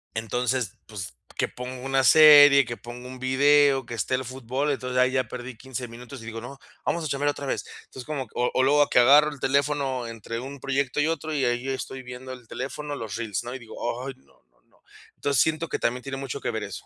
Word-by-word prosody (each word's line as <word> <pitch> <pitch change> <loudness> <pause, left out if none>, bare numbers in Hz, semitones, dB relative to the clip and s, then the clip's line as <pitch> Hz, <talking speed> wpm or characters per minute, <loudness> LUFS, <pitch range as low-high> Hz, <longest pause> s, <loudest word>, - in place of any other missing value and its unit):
Entonces, 120 0 -1
pues, 95 -8 -7 0.2
que - - +1
ponga 125 +1 -7
una 135 0 +2
serie, 145 0 +8
que 120 0 -5
ponga 120 +1 -9
un 130 0 -9
video, 135 0 +4
que 120 - -8
esté 115 +3 -1
el 130 0 -3
fútbol. 130 +3 -2
Entonces, 125 -2 -3
ahí 130 0 +4
ya 130 -1 +1
perdí 125 0 -7
15 130 0 -6
minutos 120 +2 -10
y - - -11
digo: 115 0 -6
"No, 130 +4 -9 0.3
vamos 170 -2 -1
a - - 0
chambear 145 +1 0
otra 145 -1 -4
vez". 135 - -2 0.2
Entonces, 125 - -10
como 145 -4 -3
o 125 - 0
o 130 - +3
luego 145 +2 +4
que - - +4
agarro 145 +5 +7
el 145 - -10
teléfono 135 -2 0
entre 115 0 -6
un 135 +3 -8
proyecto 135 0 -1
y 150 - +3
otro, 160 -1 -2
y 140 -3 +1
ahí 120 +2 -1
estoy 130 0 -4
viendo 125 +1 -8
el 125 -2 -13
teléfono, 145 +4 -5
los 110 -6 -6
reels, 110 -4 -3
¿no?, 120 - -6
y - - -6
digo: 115 -3 -12 0.3
"Ay, 135 - -5
no, - - -28
no, - - -36
no". - - -31 0.3
Entonces, 140 -3 +1
siento 160 +1 +1
que - - -2
también 125 +2 -1
tiene 135 -1 -5
mucho 135 -3 -5
que - - -2
ver - - -3
eso. - - -7
130 Hz, 235 wpm, -25 LUFS, 120-140 Hz, 0.3 s, serie